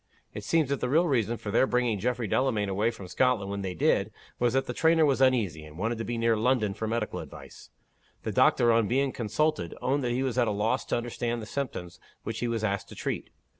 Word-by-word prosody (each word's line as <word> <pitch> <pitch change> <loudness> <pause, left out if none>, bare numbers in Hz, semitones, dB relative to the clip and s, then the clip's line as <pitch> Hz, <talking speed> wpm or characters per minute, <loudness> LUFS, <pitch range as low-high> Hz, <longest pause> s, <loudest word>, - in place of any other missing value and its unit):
It - - -6
seems 160 -5 +1
that 140 -2 0
the 125 - -1
real 160 +6 +4
reason 120 -5 +1
for 105 - -6
their 130 - +3
bringing 125 -4 +1
Geof 125 +5 0
frey 120 - -3
Delamayn 110 -2 +1
away 105 +4 +1
from 105 -5 -8
Scotland 110 -1 +1
when 100 0 -3
they 95 -2 -4
did, - - +2 0.3
was 120 -1 +2
that 135 0 +1
the - - -4
trainer 160 -1 +4
was 135 -2 +1
uneasy, 110 -12 +2
and 75 0 -12
wanted 115 +4 -2
to - - -2
be 120 +1 -3
near 115 0 +2
London 110 -2 +1
for 110 +2 -4
medical 115 -1 -2
advice. - - -11 0.5
The - - -2
doctor, 120 - +4
on 115 -2 +3
being 135 +4 +1
consulted, 115 - -1
owned 140 +2 0
that 125 - 0
he 125 +2 0
was 130 -1 -1
at 120 - +3
a - - +1
loss 110 +5 0
to - - 0
understand 120 0 -3
the 110 - -6
symptoms 110 -9 -5 0.2
which 110 -1 -4
he 120 - -1
was 115 -2 -2
asked 100 -1 -1
to - - -10
treat. - - -4
115 Hz, 245 wpm, -28 LUFS, 105-130 Hz, 0.5 s, real